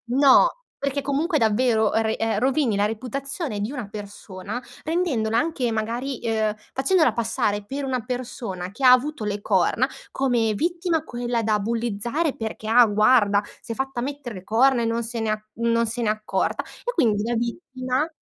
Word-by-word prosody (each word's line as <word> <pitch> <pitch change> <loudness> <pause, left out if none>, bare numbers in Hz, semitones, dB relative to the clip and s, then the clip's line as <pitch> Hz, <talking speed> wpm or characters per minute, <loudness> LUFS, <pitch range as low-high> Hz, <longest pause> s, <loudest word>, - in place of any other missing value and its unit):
no, 280 - +7 0.3
perché 280 0 -2
comunque 295 +4 0
davvero 220 -1 +2
re 220 0 +1
ehm, 225 -2 0
rovini 260 -2 +2
la 200 +1 +2
reputazione 255 - -4
di 210 +4 -2
una 250 -8 -5
persona 205 +1 -7 0.2
rendendola 280 -10 0
anche 285 -6 0
magari 235 +4 -2
uhm, 220 -2 +1 0.2
facendola 290 - +3
passare 215 -3 -1
per 275 +5 -4
una 255 -2 -1
persona 235 -7 -5
che 235 +7 -8
ha 250 - +9
avuto 255 0 +2
le 205 -1 -2
corna, 205 +6 +2 0.2
come 240 -5 +1
vittima 340 - 0
quella 240 -4 -2
da 215 -1 +2
bullizzare, 235 +7 -1
perché: 220 -1 -5
"Ah 240 +2 +7
guarda, 210 -1 +4 0.2
s'è 230 - -5
fatta 265 0 -3
mettere 275 -3 -5
le 185 - -9
corna 240 +5 +3
e - - 0
non 230 +1 0
se 230 +1 -4
ne 215 -1 -2
non 230 0 +1
se 235 +2 -3
ne 225 - +1
è - - +5
accorta" 215 0 -1 0.2
e - - -1
quindi 220 - +2
la 235 - -1
vittima 255 +3 -2
235 Hz, 170 wpm, -24 LUFS, 215-270 Hz, 0.3 s, ha